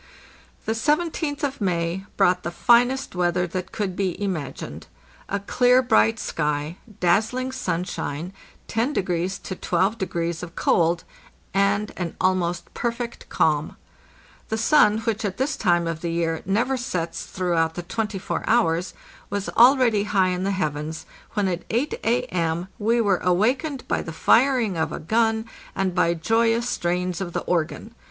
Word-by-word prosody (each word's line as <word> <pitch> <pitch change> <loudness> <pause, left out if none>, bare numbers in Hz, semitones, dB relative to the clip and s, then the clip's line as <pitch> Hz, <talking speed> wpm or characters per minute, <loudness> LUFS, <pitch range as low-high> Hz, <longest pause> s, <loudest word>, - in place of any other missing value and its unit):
The 220 - 0
Seventeenth 300 +3 0
of 275 -4 -2
May 175 0 -1
brought 180 0 +3
the 170 - -3
finest 245 +8 +3
weather 180 0 +1
that 185 +2 -5
could 200 -4 -3
be 185 -3 -1
imagined. 185 -9 -4 0.4
A 200 - -1
clear, 250 +5 +3
bright 110 - +3
sky, 150 +2 -2 0.2
dazzling 220 +9 +1
sunshine, 180 - -3 0.3
10° 190 - -1
to 185 - -5
12° 175 -3 -1
of 175 -1 -8
cold, 170 0 +2 0.5
and 200 +2 +2
an 175 -2 -4
almost 175 -2 0
perfect 235 0 -4
calm. 150 -1 +1 0.7
The 220 - -1
sun, 215 -4 +4
which 225 -1 -1
at 195 -2 -2
this 270 +2 0
time 175 -4 +2
of 165 -1 -3
the 170 - -2
year 165 -1 -1
never 240 +7 +1
sets 180 -9 -3
throughout 170 -3 0
the 175 - -4
twenty 215 +3 -3
four 190 - -3
hours, 180 -6 +2 0.3
was 205 -1 -3
already 240 -4 +5
high 195 -3 +2
in 180 0 -2
the 195 - 0
heavens, 160 -3 -3 0.3
when 205 -2 +1
at 175 -2 -2
8 250 +7 0
A.M. 180 -8 0
we 230 +3 +2
were 200 -5 +3
awakened 250 - 0
by - - 0
the 165 - -6
firing 230 - +3
of 160 -1 0
a - - -4
gun, 225 +5 +1 0.3
and 190 -2 0
by 170 -1 +2
joyous 230 +6 +2
strains 180 -2 -1
of 175 -3 -4
the - - -1
organ. 175 +6 -2
190 Hz, 150 wpm, -24 LUFS, 170-230 Hz, 0.7 s, already